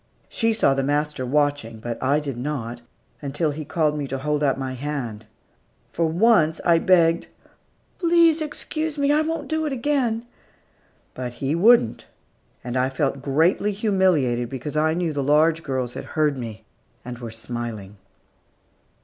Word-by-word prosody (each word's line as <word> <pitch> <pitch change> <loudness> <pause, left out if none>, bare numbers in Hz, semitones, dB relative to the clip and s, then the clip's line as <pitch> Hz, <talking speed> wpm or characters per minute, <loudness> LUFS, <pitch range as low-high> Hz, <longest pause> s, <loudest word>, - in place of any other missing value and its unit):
She 225 -1 +1
saw 215 -10 +3
the 135 - 0
master 145 -1 -1
watching, 145 -5 0
but 120 +1 -5
I 140 +3 +2
did 140 -4 -4
not, 120 -3 -4 0.4
until 150 +2 -1
he 155 +2 -5
called 150 0 0
me 145 -2 -3
to 135 - -3
hold 150 +2 -1
out 135 -2 +2
my 130 -1 -4
hand. 125 -6 -5 0.7
For 165 - +1
once, 170 -2 +3
I 170 -1 +5
begged, 170 -2 +3 0.7
"Please 335 -2 +4
excuse 310 0 -3
me; 285 0 +2
I 300 +1 +4
won't 325 +1 -3
do 315 0 -1
it - - -3
again." 245 -3 0 0.9
But 125 -1 -5
he 135 +4 -2
wouldn't, 190 - +4 0.6
and 120 0 -5
I 130 +1 +2
felt 135 0 -1
greatly 165 +9 +2
humiliated, 185 - +1
because 135 +3 -6
I 160 +1 +2
knew 170 -3 -1
the 145 - -1
large 155 +4 +3
girls 130 -5 -3
had - - -7
heard 150 -2 +3
me 115 -4 -7 0.4
and 120 -1 -7
were 120 -2 -6
smiling. 110 -3 -6
150 Hz, 160 wpm, -23 LUFS, 130-185 Hz, 0.9 s, I